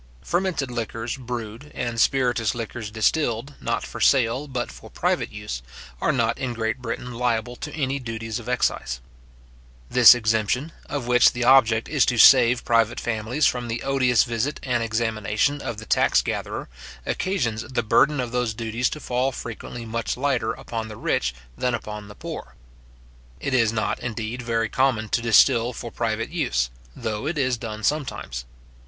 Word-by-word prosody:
Fermented 175 -7 -1
liquors 115 0 -3
brewed, 120 +1 -6
and 120 -1 -2
spiritous 125 -5 +2
liquors 115 -1 -5
distilled, 115 +3 0
not 115 0 -1
for - - -8
sale, 130 +2 +3
but 125 -3 -3
for - - -13
private - - -1
use, - - -5 0.4
are - - +3
not - - 0
in 125 -2 -3
Great 110 +2 -1
Britain 120 +1 -5
liable 120 0 -1
to 150 - -6
any 140 -2 -1
duties 115 -2 -4
of 120 +1 -8
excise. 65 - 0 0.9
This 125 -1 +9
exemption, 115 +6 0 0.2
of 140 -4 -3
which 125 0 +5
the 120 - -2
object 120 -3 +5
is 145 -2 +3
to 125 - +1
save 125 0 +7
private 115 -1 +2
families 120 +5 -1
from 125 -1 +1
the 115 0 -3
odious 130 -3 +3
visit 120 +4 -2
and 125 -2 0
examination 115 +4 0
of 115 - -4
the 110 - -8
tax - - +3
gatherer, - - -4 0.4
occasions 120 - -1
the 125 -2 -2
burden 145 +6 +3
of 125 -2 -2
those 125 -3 -1
duties 115 +2 -1
to 150 - -6
fall 130 -1 0
frequently 120 0 -7
much 115 +1 -3
lighter 125 -4 0
upon 115 -1 -5
the 110 -1 -9
rich - - 0 0.2
than 125 -1 0
upon 105 -2 -7
the 105 - -12
poor. - - -8 0.8
It 140 - -3
is 115 -4 +3
not, 110 -1 -1
indeed, 115 +1 -4
very 115 -2 0
common 110 -3 +1
to 115 - +1
distil 120 +1 +4
for 120 0 -7
private 115 -1 -2
use, 65 - 0 0.2
though 110 +5 -3
it 160 0 -2
is 130 -3 +1
done 110 -2 -6
sometimes. 115 - -2
120 Hz, 165 wpm, -24 LUFS, 110-130 Hz, 0.9 s, This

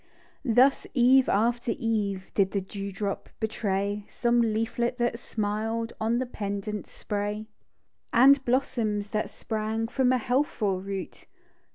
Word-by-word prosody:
Thus, 260 +2 +4
eve 255 +1 +5
after 235 +2 +1
eve, 210 -6 -1
Did 195 -2 +2
the 200 - +1
dew 200 +1 -6
drop 200 +1 -4
betray 205 -2 -1
Some 240 0 +2
leaflet 230 +2 0
that 240 -1 0
smiled 225 +1 -2
< - - -18
>u 225 +2 +2
the 255 - 0
pendant 205 -2 -4
spray; 205 -1 -3
THE - - -6
DEW 215 - -6
DROP. 220 - -21 0.8
And 275 -1 +6
blossoms 225 -5 0
that 215 0 -1
sprang 220 0 -2
From 250 +1 +2
a 255 - +4
healthful 235 -6 0
root. 195 -1 -6
220 Hz, 150 wpm, -27 LUFS, 205-240 Hz, 0.8 s, And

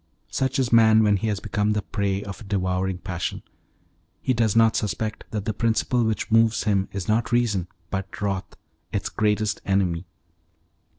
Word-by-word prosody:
Such 130 -1 0
is 125 -3 0
man 110 -1 +6
when 105 -1 +4
he 110 - -2
has 105 -2 -1
become 105 +1 0
the 105 -1 -1
prey 100 -2 -1
of 100 -2 -8
a - - -10
devouring 95 -1 -1
passion. 90 -2 -4 0.8
He 130 - 0
does 115 -3 +1
not 115 -1 +5
suspect 110 +1 -2
that 105 -2 -4
the 110 - -1
principle 115 +3 +1
which 110 0 -1
moves 115 0 +4
him 100 -3 +1
is 100 -2 -5
not 110 +3 +1
reason 110 -7 +1 0.2
but 95 -1 -4
wrath, 100 -2 -3 0.4
its - - -2
greatest 105 0 0
enemy. 90 -3 0
105 Hz, 170 wpm, -24 LUFS, 95-110 Hz, 0.8 s, man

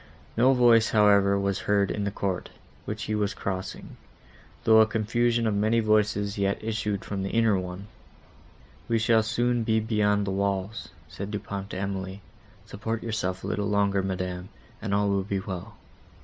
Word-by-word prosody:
No 125 +4 +5
voice, 120 -3 +5
however, 100 -2 +4
was 100 -1 -1
heard 100 -1 +1
in 105 - -2
the - - 0
court, 95 -2 -3 0.4
which - - -4
he 110 - -3
was 105 0 0
crossing, 95 0 -5 0.7
though 110 0 +6
a 110 - +5
confusion 115 +2 +1
of 110 - +1
many 110 +3 +2
voices 105 -2 +1
yet 100 +1 +1
issued 105 -2 -2
from 100 -1 -3
the 95 - -2
inner 115 -1 +3
one. 90 +2 -6 1.0
"We 115 - +2
shall 110 0 +3
soon 120 +2 0
be 110 0 +2
beyond 105 -2 +1
the 100 - -2
walls," 100 +1 -2 0.2
said 100 +6 -7
Du 105 - -2
Pont 100 -1 -6
softly 100 - -7
to 95 - -2
Emily, 95 0 -4 0.4
"support 110 +2 -4
yourself 95 -5 -2
a - - -4
little 105 0 -1
longer, 100 -1 +2
Madam, 90 -1 -4 0.3
and 105 - -3
all 100 0 +2
will 100 -1 +1
be 100 0 -2
well." 95 +2 -7
105 Hz, 175 wpm, -26 LUFS, 100-110 Hz, 1.0 s, though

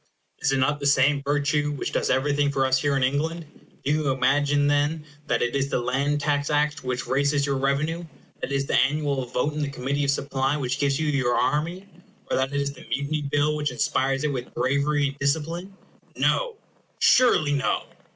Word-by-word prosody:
Is 135 - +1
it 135 - +2
not 145 +3 +1
the 140 - -1
same 140 +1 +3
virtue 145 +1 0
which 145 - -4
does - - 0
everything 145 +1 +1
for 135 -1 +1
us 130 0 +2
here 145 -2 +1
in 135 - +1
England? 160 +5 -1 0.4
Do 140 - +1
you 150 -1 +1
imagine, 145 +2 +2
then, 145 +2 +1 0.2
that 115 -4 +1
it 120 +2 -1
is 140 0 0
the - - 0
Land 140 +4 0
Tax 145 -1 0
Act 150 0 0
which 125 -1 -3
raises 140 +1 +1
your 140 -1 0
revenue? 145 +5 -1 0.4
that - - -4
it - - 0
is 135 0 0
the - - -3
annual 140 -1 +1
vote 125 +5 -1
in 150 - -3
the 145 - -1
Committee 140 +2 -2
of - - -1
Supply 135 0 0
which 130 -1 -2
gives 140 0 +1
you 160 - 0
your 135 -5 +1
army? 165 +8 -1 0.4
or - - +2
that 130 +1 0
it 140 - -1
is 140 0 -2
the 130 - -13
Mutiny 145 +2 -1
Bill 150 +1 +2
which 150 -1 -1
inspires 135 +2 0
it 150 -2 0
with 125 -1 -5
bravery 140 +2 +1
and 140 +1 -11
discipline? 165 +7 -2 0.4
No! - - +1 0.4
surely 155 - +4
no! 140 -2 0
140 Hz, 205 wpm, -25 LUFS, 135-150 Hz, 0.4 s, surely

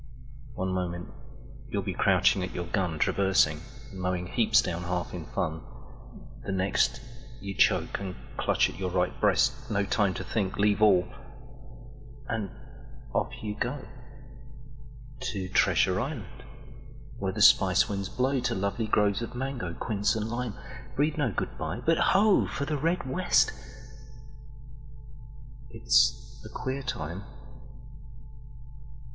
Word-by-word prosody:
One 95 0 -2
moment 90 -1 -3 0.6
you'll - - -2
be - - -3
crouching 95 - +3
at 90 - -4
your 90 - -3
gunTraversing, 95 +2 +2 0.3
mowing 90 -1 -2
heaps 110 +4 +3
down 90 -6 -1
half 90 -1 -2
in - - -6
fun:The 80 +4 -7
next, 95 +6 +1 0.4
you 100 0 -5
choke - - +2
and 95 -2 -5 0.2
clutch - - +2
at - - -9
your 95 -1 -1
right 90 0 0
breast—No 105 +1 +2
time 100 -2 +1
to - - -4
think—leave 100 +1 0
all—and 120 +4 -2 0.6
off - - 0
you 105 -1 -2
go…To 130 -3 -8
Treasure 90 0 +3
Island 120 - -6 0.7
where 95 -1 -1
the 105 0 +2
Spice 95 -3 +6
winds 100 -2 -3
blow, 130 +3 0
To 120 -1 -1
lovely 100 +3 -1
groves 105 0 +2
of 115 - -6
mango, 125 -9 -4
quince 105 0 0
and 110 -1 -2
lime—Breathe 125 +5 -3
no 130 -6 +1
good - - -4
bye, - - -3
but 165 0 +3
ho, 205 +1 +4
for 140 - -3
the 150 - -1
Red 165 0 0
West! 180 +7 +3 2.2
It's 60 0 +2
a - - -9
queer 130 +1 -4
time. 90 - -5
105 Hz, 120 wpm, -28 LUFS, 95-130 Hz, 2.2 s, Spice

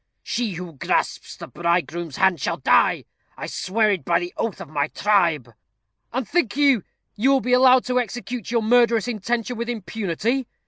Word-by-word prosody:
She 230 -4 -2
who 175 -1 -7
grasps 135 - -2
the - - -8
bridegroom's 170 -2 -2
hand 190 -6 +2
shall - - -1
die. - - +3 0.3
I - - -5
swear 215 +2 0
it 190 -4 -2
by 170 -1 +2
the 175 0 -6
oath 225 -4 -3
of - - -8
my 145 0 -1
tribe." 170 - +1 0.6
"And 250 -1 -3
think 285 - 0
you, 275 -6 +4 0.3
you 240 +6 +2
will 275 -1 +4
be 250 -1 -1
allowed 255 0 +5
to 250 0 +1
execute 245 -1 -5
your 230 -1 0
murderous 235 -1 +3
intention 235 +1 -2
with 235 +1 -4
impunity?" 220 +3 -2
220 Hz, 175 wpm, -22 LUFS, 175-245 Hz, 0.6 s, allowed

